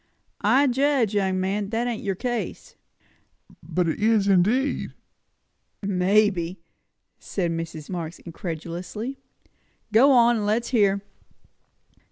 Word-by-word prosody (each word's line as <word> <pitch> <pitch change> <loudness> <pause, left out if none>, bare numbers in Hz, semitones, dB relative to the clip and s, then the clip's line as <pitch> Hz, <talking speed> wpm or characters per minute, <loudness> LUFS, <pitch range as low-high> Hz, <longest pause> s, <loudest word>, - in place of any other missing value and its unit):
"I 275 +2 +4
judge, 265 -4 +2
young 190 -2 +1
man, 195 +2 -1
that 230 +2 -1
ain't 240 -2 -3
your 195 -2 -2
case." 240 +3 -4 0.9
"But 180 -1 -1
it 160 - -2
is, 215 -1 +3
indeed!" 210 +9 +1 0.9
"Maybe," 190 -2 +1 0.6
said 175 -4 -2
Mrs. 165 -2 -5
Marx 170 -3 -5
incredulously. 175 - -6 0.7
"Go 260 +6 +6
on, 240 -2 +5
and 210 - -2
let's 230 +3 0
hear." 200 -5 +2
200 Hz, 110 wpm, -24 LUFS, 180-235 Hz, 0.9 s, Go